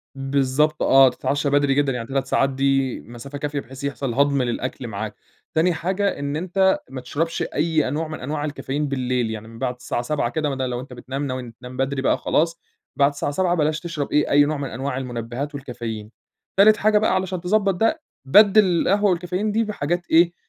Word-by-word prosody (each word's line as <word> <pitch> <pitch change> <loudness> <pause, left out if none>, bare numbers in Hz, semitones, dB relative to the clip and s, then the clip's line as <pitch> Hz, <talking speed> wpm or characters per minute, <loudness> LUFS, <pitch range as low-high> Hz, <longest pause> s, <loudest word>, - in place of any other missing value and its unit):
بالضبط 140 +2 +1
آه، 135 -1 +7
تتعشى 140 +3 -1
بدري 145 -1 +3
جدًا، 145 0 +2
يعني 115 -2 -4
3 135 -1 -1
ساعات 135 0 +2
دي 135 -1 +1
مسافة 120 +5 -9
كافية 145 0 -3
بحيث 135 +1 -10
يحصل 140 -3 -2
هضم 140 +1 +2
للأكل 125 +1 -3
معاك، 110 0 -5 0.4
تاني 170 +3 +3
حاجة 190 +4 -1
إن 140 0 -3
أنت 190 +3 +2
ما 130 -1 -6
تشربش 165 +6 -2
أي 155 0 0
أنواع 155 +5 -2
من 155 - -6
أنواع 145 +3 -3
الكافيين 145 0 -3
بالليل 125 -4 -1
يعني، 110 0 -6
من 115 0 -12
بعد 125 -2 -1
الساعة 125 -1 -3
19:00 125 -1 -1
كده 155 -2 -1
مدا 130 -2 -2
لو 120 -1 -3
أنت 130 0 -9
بتنام 135 +3 -4
ناوي 130 -2 -5
تنام 125 0 -9
بدري 135 0 -1
بقى - - +2
خلاص، 165 +2 0 0.4
بعد 140 0 +4
الساعة 145 0 -3
19:00 175 +3 +1
بلاش 155 -1 +1
تشرب 165 -5 -4
إيه 150 - +2
أي 145 0 +6
نوع 155 +1 -1
من 140 -2 -4
أنواع 130 +2 -3
المنبهات 125 +3 -4
والكافيين، 115 -5 -6 0.5
تالت 210 +2 +7
حاجة 215 0 +3
بقى 210 -2 +2
علشان 185 -1 -2
تضبّط 195 +2 +2
ده، 225 - +1 0.2
بَدِّل 205 +7 +6
القهوة 195 +3 +2
والكافيين 180 +4 -1
دي 225 +2 +2
بحاجات 175 -5 -2
إيه، 170 +1 +5
140 Hz, 195 wpm, -22 LUFS, 130-170 Hz, 0.5 s, آه